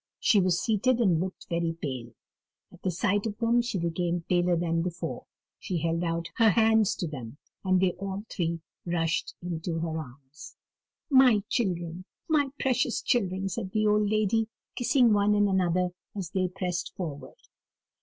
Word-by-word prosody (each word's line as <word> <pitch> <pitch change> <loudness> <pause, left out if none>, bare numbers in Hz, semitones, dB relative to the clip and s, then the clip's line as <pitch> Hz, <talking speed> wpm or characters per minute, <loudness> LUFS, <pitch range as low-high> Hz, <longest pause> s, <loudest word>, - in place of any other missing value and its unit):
She 210 - +4
was 180 -2 +2
seated, 225 +5 +2
and 185 -9 +3
looked 185 +2 -4
very 170 -1 -1
pale. 125 -6 -5 0.6
At 180 - -17
the 190 - 0
sight 200 +4 0
of 210 -1 -5
them 235 +1 +3
she 235 -4 -3
became 170 0 -1
paler 175 -1 +2
than 165 0 0
before; 175 0 -4 0.3
she 180 - -3
held 165 +1 0
out 170 0 -1
her 225 -1 +6
hands 220 -1 +4
to 175 - -3
them, 130 -4 -7 0.3
and 185 -1 +3
they 185 -1 +3
all 200 +1 -4
three 170 -4 -2 0.2
rushed 165 -2 -1
into 170 -1 -3
her 160 -1 -2
arms. 140 +1 -11 0.6
"My 255 -6 +6
children, 180 -5 -2 0.2
my 295 -3 +2
precious 255 -2 +1
children!" 195 -5 0
said 195 -2 -4
the 215 0 +2
old 210 0 +3
lady, 215 +1 +2 0.3
kissing 245 -2 +4
one 205 0 +3
and 205 0 +4
another 180 -2 +1 0.3
as 190 -5 -5
they 185 -1 +1
pressed 180 -1 -4
forward. 155 -6 -6
185 Hz, 165 wpm, -28 LUFS, 170-210 Hz, 0.6 s, her